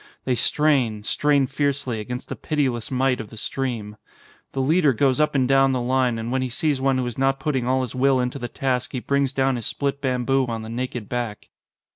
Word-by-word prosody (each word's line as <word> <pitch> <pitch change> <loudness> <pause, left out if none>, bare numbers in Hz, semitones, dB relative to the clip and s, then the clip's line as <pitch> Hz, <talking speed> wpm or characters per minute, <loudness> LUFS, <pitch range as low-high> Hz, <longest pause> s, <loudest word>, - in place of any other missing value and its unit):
They 130 - +1
strain, 125 -5 +2
strain 145 +4 +2
fiercely, 135 -3 -1
against 125 +4 -5
the - - -3
pitiless 130 -7 -1
might 130 -1 +1
of 110 - -10
the 110 - -12
stream. 110 -4 -4 0.6
The 135 - -3
leader 150 +1 +3
goes 130 +3 +2
up 150 -1 +2
and 130 -2 +3
down 135 0 +4
the 130 - 0
line 125 -1 +1
and 115 +1 -4
when 130 0 +1
he 130 - -2
sees 140 +2 0
one 135 -1 +2
who 130 - 0
is 120 0 -5
not 135 0 +2
putting 135 -4 -1
all 130 +1 +2
his 125 -4 -4
will 130 +1 +3
into 125 +2 -2
the 120 - -4
task 125 -1 -2
he 130 - -1
brings 140 +1 0
down 135 -1 +1
his 115 - -4
split 140 0 -2
bamboo 130 0 +1
on 115 -2 -4
the 110 - -7
naked 120 -2 -4
back. 120 -4 -4
130 Hz, 220 wpm, -23 LUFS, 120-135 Hz, 0.6 s, down